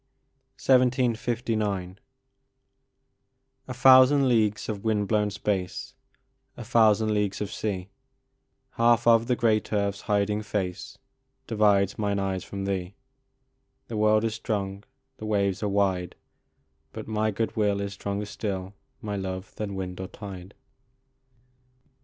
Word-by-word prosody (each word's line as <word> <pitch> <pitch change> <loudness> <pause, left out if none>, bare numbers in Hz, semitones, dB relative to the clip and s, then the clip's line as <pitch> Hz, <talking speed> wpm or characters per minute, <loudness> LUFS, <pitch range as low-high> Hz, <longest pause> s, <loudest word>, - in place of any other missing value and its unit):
1759 115 -6 +1 1.7
THOUSAND 130 +2 +6
leagues 110 -4 +1
of 105 -3 -4
wind 105 -2 0
blown 105 0 +1
space, 95 -2 -3 0.6
A 120 - -6
thousand 110 -2 +3
leagues 105 -2 -1
of 105 -1 -4
sea, 100 -4 -4 0.8
Half 120 0 +3
of 115 0 +5
the 125 - +2
great 110 -3 +1
earth 100 -2 +1
s 100 - -12
hiding 105 0 0
face 100 -4 -4 0.5
Divides 100 -3 +2
mine 100 -1 0
eyes 95 -2 -2
from 100 -1 -6
thee; 95 -1 -3 0.9
The 115 - -4
world 110 0 +3
is 115 -1 0
strong, 100 -3 -3 0.3
the 110 - -7
waves 100 -3 0
are 105 - 0
wide, 95 -3 0 0.8
But - - -7
my 110 0 0
good 110 +2 -2
will 105 -2 +1
is 100 0 -4
stronger 100 +1 -4
still, 100 -2 -4 0.3
My 105 -1 -3
love, 95 0 -5
than 100 -2 -5
wind 90 -1 -5
or 95 - -5
tide. 95 -2 -10
105 Hz, 125 wpm, -26 LUFS, 100-110 Hz, 1.7 s, THOUSAND